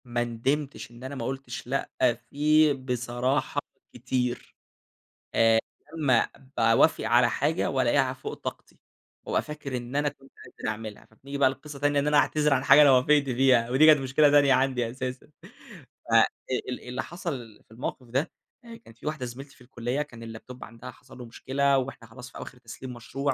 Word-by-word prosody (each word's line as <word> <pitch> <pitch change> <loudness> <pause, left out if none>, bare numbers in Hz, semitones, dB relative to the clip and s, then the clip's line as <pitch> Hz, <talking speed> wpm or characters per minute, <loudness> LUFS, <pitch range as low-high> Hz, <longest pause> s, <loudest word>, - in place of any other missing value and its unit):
ما 120 -1 -1
ندمتش 130 +4 -3
إن 120 +1 -14
أنا 130 +2 -6
ما 120 -4 -4
قُلتش 130 -2 -6
لأ 135 +2 -2 0.4
فيه 150 +1 +4
بصراحة 125 +1 -1 0.3
كتير، 125 -1 -3 0.8
آآ، 115 0 +5 0.4
لمّا 130 -7 +3 0.3
باوافق 115 +6 +4
على 120 +2 +4
حاجة 150 +4 0
وألاقيها 130 0 +2
فوق 130 - -7
طاقتي، - - -8 0.5
وأبقى - - 0
فاكر 150 -4 -6
إن 120 +2 -7
أنا 145 0 +2
كنت 135 -1 -19
قادر 125 - -6
أعملها. 110 -1 -7
فبنيجي 140 +5 -9
بقى 135 -2 +4
لقصة 140 +1 -9
تانية، 145 0 +2
إن 140 - -1
أنا 150 0 +4
أعتذر 150 0 +3
عن 130 -1 +1
حاجة 135 +2 +7
أنا 145 -2 +7
وافقت 140 +3 +4
فيها، 125 -2 +3
ودي 135 +5 +5
كانت 155 -2 +7
مشكلة 135 +3 +3
تانية 145 -1 +5
عندي 130 -2 +1
أساسًا. 130 +1 -6 0.8
ف - - -1 0.6
ال 125 - -4
اللي 125 - -3
حصل 140 - -7
في - - -31
الموقف 125 +2 -6
ده، 135 +7 -1 0.5
كان 115 - -14
في 115 - -17
واحدة 150 -4 -3
زميلتي 135 +4 -9
في - - -24
الكلية، 125 +2 -3
كان 115 -6 -8
الLaptop 125 +1 -11
عندها 120 +2 -10
حصل - - -17
له 125 - -8
مشكلة، 140 +4 0
وإحنا 130 -3 -4
خلاص 125 +3 -12
في - - -11
آواخر 125 - -9
تسليم 125 +1 -9
مشروع 135 +4 -3
130 Hz, 175 wpm, -27 LUFS, 120-140 Hz, 0.8 s, حاجة